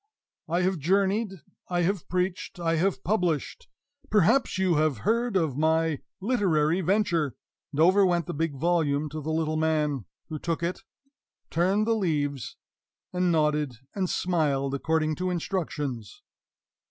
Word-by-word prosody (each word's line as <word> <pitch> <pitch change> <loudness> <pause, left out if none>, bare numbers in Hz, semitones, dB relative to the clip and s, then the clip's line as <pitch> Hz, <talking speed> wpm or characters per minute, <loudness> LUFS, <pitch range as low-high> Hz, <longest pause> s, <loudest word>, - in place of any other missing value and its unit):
I 175 +2 +1
have 185 -2 +1
journeyed, 195 +3 +1 0.3
I 175 -1 +1
have 190 0 -1
preached, 180 0 -2
I 165 -1 +1
have 190 +4 0
published 180 - -1 0.4
perhaps 210 +3 +3
you 185 -4 +2
have 155 -4 +2
heard 230 0 +2
of 155 -7 0
my 160 -1 +2 0.2
literary 185 -7 +2
venture" 175 - +1 0.4
and 145 - -5
over 185 +5 +6
went 175 -3 +2
the - - -4
big 160 -1 -1
volume 155 -1 +1
to 155 +1 -5
the 155 - -5
little 155 -1 0
man, 150 -6 0 0.2
who 155 -1 -4
took 165 +1 -2
it, 175 +2 -2 0.7
turned 190 +6 +2
the 230 - +2
leaves, 145 - -1 0.6
and 180 -1 +2
nodded 150 -5 +1 0.2
and 190 -3 -1
smiled, 145 -6 0
according 155 +2 0
to 185 0 -1
instructions. 150 - -3
165 Hz, 140 wpm, -27 LUFS, 150-185 Hz, 0.7 s, over